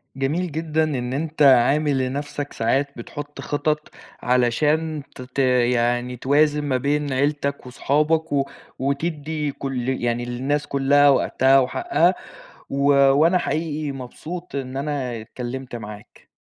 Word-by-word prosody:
جميل 155 +7 -1
جدًا 160 +1 0
إن 130 -5 -2
أنت 155 +2 -3
عامل 140 +2 +5
لنفْسك 145 +2 -5
ساعات 135 +5 0
بتحط 145 +5 -8
خطط، 150 +1 -1 0.3
علشان 150 +5 +1
ت - - -9
ت 125 +2 -6 0.3
يعني 120 +1 0
توازن 150 +3 +2
ما 135 -3 0
بين 145 +2 -1
عيلتك 140 +1 -1
وصحابك 150 +5 0
و 140 -1 +2 0.3
وتدّي 150 +1 -2
كُل 130 -2 -4
يعني 120 -2 -1
للناس 135 +5 -2
كُلها 140 +1 +4
وقتها 135 0 +4
وحقها 345 - +1 0.5
و 140 - -4 0.3
وأنا 160 +6 +4
حقيقي 155 -3 -2
مبسوط 155 +7 -8
إن 135 -1 -4
أنا 135 -5 -3
اتكلمت 125 +3 -7
معاك. 105 -2 -10
140 Hz, 125 wpm, -22 LUFS, 130-150 Hz, 0.5 s, عامل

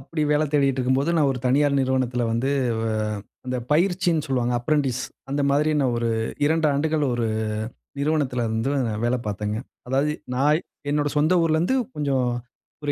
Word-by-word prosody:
அப்படி 155 +4 -3
வேல 150 +1 +3
தேடிட்டு 135 -2 +2
இருக்கும்போது 130 +5 +1
நான் 150 -3 +3
1 125 - -5
தனியார் 140 +2 +3
நிறுவனத்தில 130 -2 0
வந்து 120 +4 0 0.3
வ - - -2 0.6
அந்த 125 0 -1
பயிற்சின்னு 175 -1 +2
சொல்லுவாங்க 125 -3 0
அப்ரென்டிஸ், 130 -1 0 0.3
அந்த 140 +1 0
மாரி 150 +2 +2
நான் 130 -3 +1
ஒரு 115 - 0 0.4
2 160 +1 +2
ஆண்டுகள் 150 +1 +1
1 120 -1 0 0.7
நிறுவனத்தில 140 -5 0
இருந்து 115 +5 -1
நா 110 - -2
வேல 120 +1 +2
பார்த்தேங்க. 105 +1 -2 0.3
அதாவது 135 +3 +1 0.2
நா 130 - +1 0.5
என்னோட 145 0 +1
சொந்த 160 +5 +4
ஊர்லருந்து, 165 +9 +2 0.2
கொஞ்சம் 140 -4 +1 0.6
ஒரு 145 - 0
140 Hz, 155 wpm, -24 LUFS, 125-150 Hz, 0.7 s, சொந்த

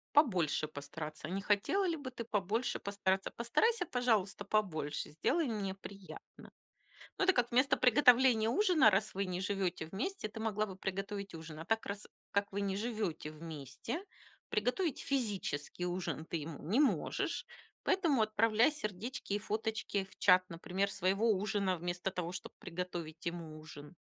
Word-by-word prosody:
Побольше 180 - +4
постараться. 155 +1 -6
Не 195 +2 -2
хотела 210 - +2
ли 335 - +1
бы 285 -4 -6
ты 235 -2 -6
побольше 215 +2 0
постараться? 195 -1 0
Постарайся, 360 - +2
пожалуйста, 220 -8 +1
побольше, 170 -9 -1
сделай 280 - +1
мне 205 -5 -2
приятно. 195 0 -11 0.7
Ну, - - +1
это 380 - +6
как 245 -1 +1
вместо 255 +3 +4
приготовления 250 -3 +6
ужина, 340 - +5
раз 200 +1 +1
вы 195 +1 -1
не 180 -1 -3
живёте 190 -3 -1
вместе, 215 - -3
ты 215 - -9
могла 215 -1 0
бы 190 -3 -8
приготовить 195 +1 -4
ужин. 160 -1 -8
А 165 - -6
так, 225 +3 0
раз, 200 +1 -5 0.2
как 200 0 +1
не 200 -1 -1
живёте 205 -8 -2
вместе, 155 - -6 0.5
приготовить 250 - 0
физический 200 - -1
ужин 175 -4 -2
ты - - -2
ему 155 -1 -7
не 205 - +2
можешь. 295 - +1 0.4
Поэтому 330 - +3
отправляй 215 +4 +4
сердечки 215 - -4
и - - 0
фоточки 215 -1 -1
в 190 - -16
чат, 185 -1 +6
например, 185 +4 -1
своего 195 +4 +1
ужина, 200 -1 +1
вместо 175 +2 -2
того, 175 -2 -3
чтоб - - -6
приготовить 170 -3 -5
ему 165 -2 -5
ужин. 155 +1 -11
200 Hz, 150 wpm, -34 LUFS, 180-230 Hz, 0.7 s, это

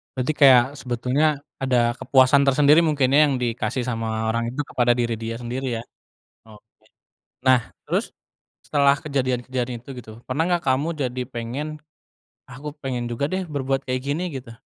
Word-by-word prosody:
Berarti 130 +4 0
kayak 130 -4 +8 0.2
sebetulnya 125 +4 0 0.4
ada 130 -2 +2 0.2
kepuasan 135 +1 +4
tersendiri 145 +3 +5
mungkin 145 -5 +2
ya 145 - +6
yang 140 - 0
dikasih 125 +1 -2
sama 110 -2 -2
orang 115 0 -1
itu 130 +5 -3
kepada 120 -1 +1
diri 120 -1 0
dia 115 0 -4
sendiri 125 +3 -4
ya, 115 - -6 0.7
oke. 110 +1 -19 0.6
Nah 130 -2 +5 0.2
terus - - -1 0.6
setelah 140 -1 +3
kejadian-kejadian 130 -3 -2
itu - - -15
gitu, 110 - -12 0.2
pernah 145 +5 0
gak 170 - -14
kamu 135 +5 +1 0.2
jadi 125 0 -3
pengen, 120 +5 -4 0.8
ah 130 - -11
aku 150 0 -6
pengen 125 -2 -2
juga 120 +4 -1
deh 185 0 -1
berbuat 135 -3 -2
kayak 130 0 -1
gini, 145 +6 -1
gitu? 115 0 -12
130 Hz, 160 wpm, -23 LUFS, 120-140 Hz, 0.8 s, kayak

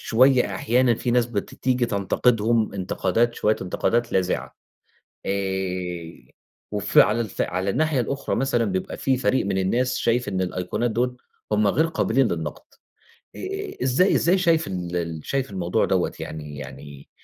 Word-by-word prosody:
شوية 125 -3 +3
أحيانًا 120 +4 +2
في 120 - -2
ناس 120 -1 +3
بتيجي 120 +2 -1
تنتقدهم 110 +2 +1
انتقادات 100 +5 0
شوية 105 +1 +1
انتقادات 115 +6 0
لاذعة 95 -1 -1 0.7
آآ، 90 -6 -3 0.4
وف - - +1
على 110 +3 +5
الف 110 -4 -2
على 95 +2 -1
الناحية 155 +2 +1
الأخرى 135 +4 -2
مثلًا 125 -3 +1
بيبقى 95 -3 -3
في 130 -1 +1
فريق 130 -4 +1
من 95 -1 0
الناس 125 +7 +1
شايف 120 0 +1
إن 95 -2 -1
الأيقونات 95 +6 -1
دول 125 +2 -1 0.4
هم 105 0 +3
غير 160 +11 +3
قابلين 135 -5 +1
للنقد. 80 - -4 0.7
إ 395 - -5
إزاي 135 +10 +3
إزاي 180 +3 +3
شايف 165 -3 +2
إن 90 -2 -4
ال 85 -2 -2
شايف 135 -3 -1
الموضوع 95 +2 0
دوّة 95 -2 +1
يعني 75 -2 -7
يعني 70 +1 -10
110 Hz, 145 wpm, -24 LUFS, 95-125 Hz, 0.7 s, على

